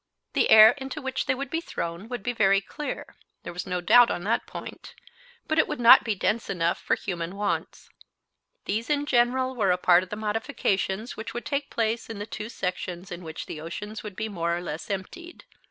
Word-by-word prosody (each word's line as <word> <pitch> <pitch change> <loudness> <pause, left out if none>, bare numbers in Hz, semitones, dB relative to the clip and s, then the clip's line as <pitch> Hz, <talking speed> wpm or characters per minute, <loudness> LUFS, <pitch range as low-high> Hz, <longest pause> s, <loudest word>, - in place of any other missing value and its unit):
The - - +2
air 220 0 +10
into 270 +3 -5
which 265 -2 -3
they 260 - +2
would 275 +1 -5
be 325 - -1
thrown 170 - -5
would 245 -5 -5
be 245 - -1
very 195 -3 +4
clear; 295 +9 -7 0.3
there - - -7
was 180 - -5
no 180 -1 -2
doubt 240 +7 +6
on 175 - -3
that 220 +4 0
point, - - -9 0.5
but 315 0 +1
it - - +4
would 300 - -4
not 235 0 +8
be 220 -3 -1
dense 215 +4 -1
enough 170 -2 0
for - - +1
human 175 -1 -5
wants. 205 0 -3 0.8
These 220 +4 -2
in 290 -1 +1
general 255 0 +2
were 210 -5 +1
a 180 - +3
part 180 -1 +5
of 185 - -9
the 210 - -4
modifications 215 -1 -2
which 220 - -7
would 240 - -5
take 280 -1 -2
place 230 0 -1
in 225 - -6
the 205 - -5
two 215 0 -6
sections 180 -3 -4
in 175 +1 -7
which 160 -1 -7
the 155 - -7
oceans 205 +6 -6
would 210 -3 -8
be 220 +2 -3
more 170 -4 -1
or - - -5
less 160 -2 -6
emptied. 335 - -6
215 Hz, 215 wpm, -26 LUFS, 180-245 Hz, 0.8 s, air